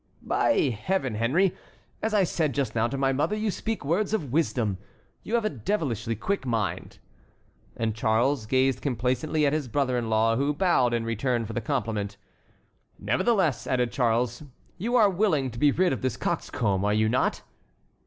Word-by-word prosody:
"By 130 - +2
Heaven, 185 -9 0
Henry, 155 - +2 0.5
as 220 - -1
I 210 -2 +3
said 160 -4 -1
just 135 -6 -1
now 115 0 +1
to 135 - -4
my 135 0 +1
mother, 150 +10 0
you 215 0 -1
speak 225 -4 -4
words 195 +8 +1
of 150 - -4
wisdom. 120 - 0 0.4
You 230 - -2
have 230 -2 +1
a - - +2
devilishly 115 - -2
quick 195 - -2
mind." 115 -6 -2 0.8
And 115 -1 -1
Charles 110 +3 +1
gazed 130 +2 +2
complacently 130 +4 0
at 140 - +2
his 155 -4 -1
brother 130 -1 0
in 115 -2 -4
law, 110 +1 +2
who 140 +2 0
bowed 130 -9 +2
in 115 -1 -2
return 115 +1 -1
for - - -6
the 120 - -2
compliment. 105 -2 -2 0.8
"Nevertheless," 130 - +1
added 125 -2 +1
Charles, 120 0 0 0.4
"you 235 +7 -1
are 220 -4 +6
willing 175 - +1
to 115 - -8
be 150 - +5
rid 180 +2 +2
of - - -4
this 130 -4 -1
coxcomb, 100 -3 -1
are 105 +1 +2
you 110 0 +3
not?" 125 +3 0
130 Hz, 175 wpm, -26 LUFS, 115-165 Hz, 0.8 s, are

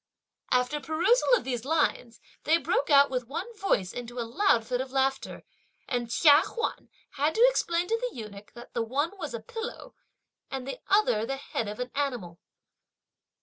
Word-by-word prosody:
After 250 +4 +2
perusal 335 - +2
of - - -6
these 245 -3 -3
lines, 255 -5 0 0.2
they 320 +2 +4
broke 475 +8 0
out, 280 -1 +6
with 250 -2 -2
one 455 - -5
voice, 200 - 0
into 245 0 -7
a 235 - -2
loud 235 - +2
fit 250 +1 -1
of 260 0 -6
laughter; 270 0 -1 0.4
and 240 -2 -2
Chia 290 +4 +6
Huan 465 - -4 0.3
had 295 +3 +1
to 470 +3 +7
explain 345 -7 0
to 455 +5 0
the - - -17
eunuch 210 -2 -9
that 240 0 -12
the 235 - -1
one 285 - -1
was 305 -8 -4
a - - -4
pillow, 455 - -7 0.6
and 265 -1 -5
the 275 - -5
other 390 - +3
the 270 - -2
head 230 -4 -4
of 210 +2 -6
an 250 0 -4
animal. 245 -12 -3
270 Hz, 180 wpm, -28 LUFS, 240-330 Hz, 0.6 s, to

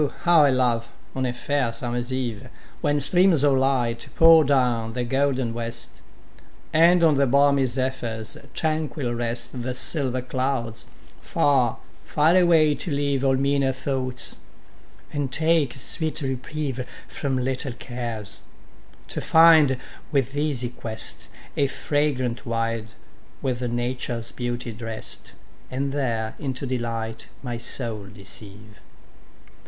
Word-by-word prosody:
how 170 -3 +6
I - - +5
love, 120 -3 +1 0.3
on 130 -1 -1
a - - 0
fair 130 0 -1
summer's 120 +2 -3
eve, 125 -2 -3 0.3
When 145 -2 +2
streams 175 +1 +3
of 145 -1 +5
light 125 -3 0
pour 165 -1 +8
down 125 -5 +1
the 125 0 -1
golden 130 -1 0
west, 115 0 -5 0.7
And 170 +2 +6
on 160 -2 +6
the 140 -1 +3
balmy 140 +1 +4
zephyrs 125 -3 -2 0.2
tranquil 155 -5 -1
rest 120 +1 -2
The 125 +1 -3
silver 130 -3 -2
clouds, 125 -3 -2 0.3
far, 130 -5 +2 0.3
far 155 +4 +3
away 165 -4 +5
to 145 +5 -3
leave 140 -2 0
All 135 -1 +3
meaner 140 0 +2
thoughts, 130 -2 -1 0.8
and 145 -3 -2
take 160 0 +2
a - - -10
sweet 155 +5 -1
reprieve 135 0 -3 0.2
From 135 -2 -2
little 130 +1 -1
cares; 115 -5 -4 0.7
to - - -2
find, 160 -5 +6 0.3
with 135 -2 0
easy 145 -5 0
quest, 115 -2 -6 0.3
A 140 - +2
fragrant 135 -4 -1
wild, 115 -1 -2 0.5
with 125 -2 -1
Nature's 120 -1 -2
beauty 120 -1 -4
drest, 115 0 -3 0.4
And 135 +2 -2
there 115 -6 -1
into 135 -1 -3
delight 115 -3 -3 0.2
my 120 -2 -4
soul 115 -4 -4
deceive. 105 +1 -12
130 Hz, 125 wpm, -24 LUFS, 120-140 Hz, 0.8 s, pour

